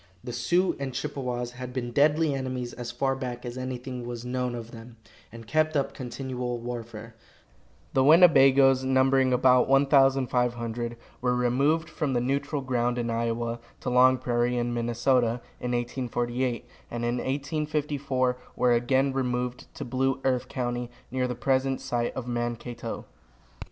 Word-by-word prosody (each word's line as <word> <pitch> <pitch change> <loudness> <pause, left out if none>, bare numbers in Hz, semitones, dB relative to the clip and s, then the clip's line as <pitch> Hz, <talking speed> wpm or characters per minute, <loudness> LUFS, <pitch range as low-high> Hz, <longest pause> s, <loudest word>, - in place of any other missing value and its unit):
The 120 - -6
Sioux 175 +10 +1
and 135 -2 -4
Chippewas 125 -2 -3
had 125 0 -8
been 120 -2 -3
deadly 150 +3 +3
enemies 130 -2 -3
as 120 -1 -6
far 135 +2 0
back 125 -2 -5
as 120 0 -5
anything 130 -1 -5
was 120 0 -6
known 125 0 -2
of 115 -1 -7
them, 115 0 -12 0.3
and 115 0 -10
kept 155 +5 +1
up 140 - -1
continual 125 -1 -4
warfare. 115 -1 -7 0.8
The 130 - +4
Winnebagoes, 135 -4 +6
numbering 130 0 +3
about 125 0 +4
1,500, 125 -4 +2 0.2
were 125 0 +1
removed 140 +7 +2
from 150 -5 -2
the 120 - +2
neutral 140 +3 -1
ground, 125 -2 0
in 120 -1 -1
Iowa, 115 0 -1 0.2
to - - -2
Long 130 +1 +6
Prairie, 120 0 0
in 120 0 -1
Minnesota, 120 +1 +1 0.2
in 125 0 -3
1848, 120 0 -2 0.2
and 120 0 -3
in 120 +1 0
1854 140 -2 -1 0.2
were 125 - +3
again 130 +3 +2
removed 125 -1 -2
to - - -5
Blue 130 +2 0
Earth 130 -2 +1
county, 120 -1 -3 0.2
near 130 0 0
the 125 - -3
present 135 +1 +1
site 120 -1 -2
of 130 -2 -5
Mankato. 120 -1 -4
125 Hz, 145 wpm, -27 LUFS, 120-135 Hz, 0.8 s, Winnebagoes